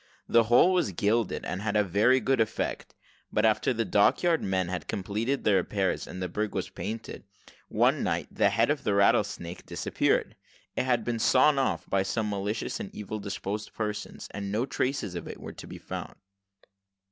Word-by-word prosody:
The 115 -1 +4
whole 125 +11 +5
was 175 - +1
gilded, 105 +4 0
and 90 +2 -3
had 105 0 -1
a 105 - +4
very 105 +8 +3
good 135 -2 +2
effect; 110 0 -2 0.4
but 105 - +2
after 110 +4 +3
the 115 -2 0
dock 100 - +3
yard 170 -2 +3
men 95 -2 0
had 90 0 -4
completed 110 +8 -2
the 105 - +3
repairs, 95 +1 0
and 90 - -7
the - - -1
brig 105 +4 -3
was - - -3
painted, 110 +1 -6 0.4
one - - +2
night - - -1
the 100 - +3
head 115 +6 +2
of 150 - -2
the 100 - +1
rattlesnake 100 -3 +1
disappeared. - - 0 0.4
It - - 0
had 120 -3 +2
been 120 0 -2
sawed 135 +5 +4
off 135 - -1
by 95 - +2
some 105 +2 -1
malicious 100 +2 -2
and 100 - -5
evil 105 +1 -5
disposed 100 +1 -5
persons, 105 -1 -4
and 100 -1 -5
no 110 +5 0
traces 130 -6 -2
of 85 - -6
it - - -8
were - - -8
to - - -10
be - - -8
found. - - -7
105 Hz, 190 wpm, -28 LUFS, 100-120 Hz, 0.4 s, whole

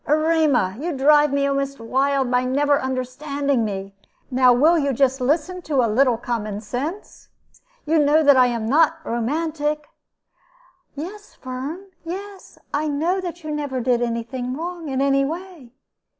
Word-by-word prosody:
"Erema, 305 - +2
you 335 +3 -3
drive 295 +1 +5
me 280 0 +1
almost 275 -1 -1
wild 265 +2 0
by 250 0 +2
never 285 +3 +2
understanding 260 +1 -1
me. 195 -2 -4 0.4
Now 255 0 +5
will 310 +8 +4
you 280 -2 0
just 265 +1 +1
listen 315 +7 0
to 285 -7 +1
a 225 -2 0
little 250 -1 +3
common 215 -4 -3
sense? 280 - -6 0.6
You 315 +1 +2
know 300 +2 +4
that 285 -1 +6
I 255 -1 +5
am 230 -2 -2
not 325 +5 +3
romantic." 300 +5 -2 1.1
"Yes, 395 +8 -8
Firm; 270 +9 -6 0.2
yes, 385 +3 -8 0.2
I 300 +2 0
know 325 +6 0
that 350 -2 -6
you 310 - -5
never 290 -3 -3
did 245 0 +1
any 235 -1 -1
thing 250 +2 -5
wrong 340 -1 -5
in 265 0 -1
any 275 0 +3
way." 325 -3 -6
280 Hz, 155 wpm, -22 LUFS, 250-315 Hz, 1.1 s, that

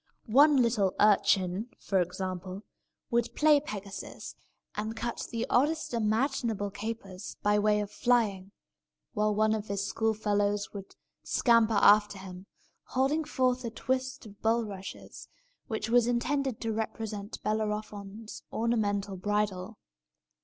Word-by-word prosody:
One 285 +6 +6
little 230 -6 +2
urchin, 200 0 +3
for 190 -2 +1
example, 185 +2 -4 0.5
would 235 -1 0
play 300 -1 +5
Pegasus, 205 -8 -7 0.4
and 215 +2 -3
cut 235 +1 -3
the 230 -1 -2
oddest 300 +3 +1
imaginable 225 -2 0
capers, 200 -2 -6
by 210 0 +3
way 210 0 +3
of 205 - -5
flying; 210 -6 +1 0.6
while 210 -2 +1
one 215 +1 +3
of 215 -1 -3
his 200 0 -2
schoolfellows 205 -2 0
would 195 -2 -9 0.3
scamper 230 -2 +3
after 205 0 +5
him, 190 0 -10 0.4
holding 275 +5 +1
forth 255 -4 0
a 235 - -2
twist 260 +2 -3
of 205 -1 -14
bulrushes, 220 -4 -3 0.4
which 220 -2 -3
was 240 0 +4
intended 260 +1 0
to 225 -1 -1
represent 215 -1 -4
Bellerophon's 210 0 -3
ornamental 205 -4 0
bridle. 205 +1 -1
215 Hz, 120 wpm, -29 LUFS, 200-235 Hz, 0.6 s, One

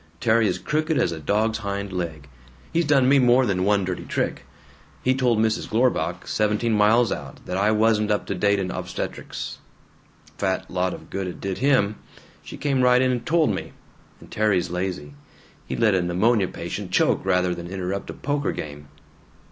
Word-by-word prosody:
Terry 115 -1 +3
is - - 0
crooked 155 0 -1
as 85 - +2
a 80 - -5
dog's 110 +8 0
hind 100 -2 -4
leg. 80 -5 -4 0.5
He's 170 0 +2
done 140 -3 +4
me 140 +1 +5
more 125 +1 +5
than 95 -4 0
one 100 -1 +2
dirty 90 -1 -4
trick. - - -2 0.6
He 130 - +3
told 125 -3 +2
Mrs. 110 0 0
Glorbach, 90 -8 0
seventeen 105 +2 +1
miles 110 +2 +4
out, - - -6
that 90 - -4
I 100 +3 +2
wasn't 110 0 +2
up 105 -1 0
to - - -3
date 100 +2 +2
in 95 -2 -2
obstetrics. - - -5 0.8
Fat 95 -1 -1
lot 90 0 0
of - - -14
good 95 -1 -3
it 90 - -7
did 95 -1 -4
him! 125 -6 +2 0.4
She - - -10
came 140 -3 0
right 125 0 +5
in 130 0 +2
and 120 -2 -2
told 160 +3 +2
me! - - -6 0.5
And - - -16
Terry's 100 -5 +1
lazy. 90 -5 -3 0.5
He'd - - -4
let 110 -3 +4
a 95 - +2
pneumonia 95 +4 +2
patient 90 +3 -6
choke 90 - +2
rather 90 -1 +2
than 85 0 -7
interrupt 95 +1 -4
a - - -4
poker 145 +1 -1
game." 75 -1 -7
105 Hz, 185 wpm, -24 LUFS, 90-120 Hz, 0.8 s, me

